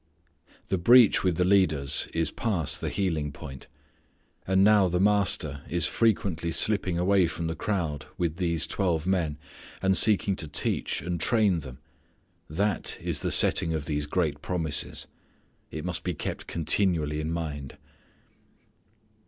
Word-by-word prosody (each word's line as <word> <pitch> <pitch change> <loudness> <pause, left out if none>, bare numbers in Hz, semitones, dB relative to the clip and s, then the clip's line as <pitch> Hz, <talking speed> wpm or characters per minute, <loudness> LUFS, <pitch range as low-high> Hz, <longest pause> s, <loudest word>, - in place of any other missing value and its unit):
The 95 -1 0
breach 120 +4 +6
with 90 -3 +1
the 90 - +2
leaders 80 -8 +2
is 80 -2 0
past 95 -10 -1
the - - -2
healing 80 -7 -2
point. 65 -1 -10 0.8
And 95 +1 +3
now 105 -2 +5
the 90 0 -1
Master 95 -8 +1
is 85 -2 +1
frequently 95 -7 0
slipping 95 -1 +1
away 95 0 +3
from 80 +1 -5
the 80 - -2
crowd 80 -10 -3
with 85 -2 -2
these 85 -3 0
twelve 85 -5 -1
men, 85 -6 0 0.4
and 95 0 +2
seeking 100 -1 +3
to 80 - -5
teach 75 - -2
and 85 -1 -3
train 105 -6 +2
them. 65 -4 -10 0.7
That 100 +5 -1
is - - -3
the - - -2
setting 80 -1 +3
of 75 -2 -4
these 75 -1 -2
great 80 -2 -1
promises. 85 -5 -2 0.6
It - - -6
must - - -3
be - - -3
kept - - -5
continually 80 -3 0
in 80 +1 -3
mind. 75 -5 -5
85 Hz, 145 wpm, -27 LUFS, 75-95 Hz, 0.8 s, breach